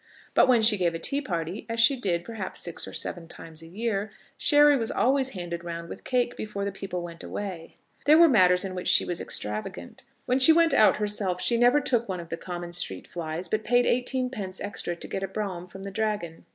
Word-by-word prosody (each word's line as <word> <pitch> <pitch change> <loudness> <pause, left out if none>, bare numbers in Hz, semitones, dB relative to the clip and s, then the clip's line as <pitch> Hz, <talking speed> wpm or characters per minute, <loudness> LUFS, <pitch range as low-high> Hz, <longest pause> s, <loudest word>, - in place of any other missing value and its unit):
But - - +5
when 240 -3 +4
she 215 -1 +6
gave 170 -2 +1
a - - -1
tea 275 - 0
party, 175 - -4
as 230 0 -2
she 235 +4 +5
did, 175 -8 -2
perhaps, 220 -5 -5
six 170 - -2
or - - -8
seven 170 -2 -4
times 160 -1 -9
a 165 - -12
year, 205 +2 -2 0.3
sherry 295 -1 +5
was 230 -4 -1
always 265 +1 +1
handed 170 -1 -5
round 170 -1 -6
with - - -9
cake 245 -1 0
before 200 -2 -4
the 200 - -2
people 190 -2 -5
went 170 -1 -9
away. 185 -5 -6 0.3
There 305 +2 +7
were 335 0 +8
matters 185 - +4
in 190 - -5
which 180 -1 -5
she - - +5
was 175 -1 -3
extravagant. 105 -4 -4 0.2
When 255 +2 +1
she 295 +5 +8
went 330 -2 +4
out 215 - +5
herself 205 -3 0
she 235 - +3
never 245 +4 +4
took 235 -5 0
one 185 -1 -3
of 170 -1 -9
the - - -3
common 175 -1 -6
street 165 - -3
flies, 170 +1 -5
but 215 +4 -1
paid 245 +2 +3
eighteen 250 +1 0
pence 190 -6 -6
extra 200 -3 -4
to - - -9
get 195 - -4
a 195 - -2
brougham 190 -3 -5
from 190 +2 -11
the 200 - -6
Dragon. 205 -6 -3
195 Hz, 230 wpm, -26 LUFS, 175-235 Hz, 0.3 s, were